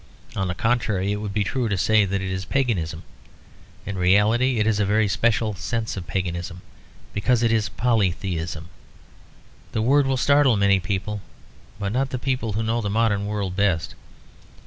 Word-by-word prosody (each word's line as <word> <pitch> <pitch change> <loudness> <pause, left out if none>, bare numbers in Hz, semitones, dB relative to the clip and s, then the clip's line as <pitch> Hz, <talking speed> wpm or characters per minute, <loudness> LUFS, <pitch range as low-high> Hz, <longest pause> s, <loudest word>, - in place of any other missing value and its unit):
On 95 -1 -1
the 90 - -3
contrary, 110 -4 0
it 105 - -1
would 105 -1 -4
be 105 +1 0
truer 115 +4 -1
to 100 - 0
say 110 +2 +3
that 95 0 -2
it 95 - -3
is 95 0 -3
paganism. 95 -11 -1 0.8
In 100 -1 -4
reality 110 +7 +3
it 105 - +2
is 110 -2 +1
in - - +3
a - - -1
very 105 +1 +3
special 110 +1 +1
sense 110 +3 -3
paganism; 90 -1 -4 0.5
because 120 +3 +1
it 115 - +3
is 110 -2 +1
polytheism. 90 -7 -1 1.0
The 110 - 0
word 140 +3 +4
will 135 -1 +1
startle 140 -3 +4
many 100 -1 +4
people, 100 +3 -3 0.6
but 100 -1 -3
not 135 +3 0
the 130 - -3
people 125 -4 -2
who 110 +2 -1
know 115 +1 0
the 105 - -2
modern 105 -1 +1
world 100 -3 -3
best. 95 -7 0
105 Hz, 175 wpm, -23 LUFS, 95-115 Hz, 1.0 s, word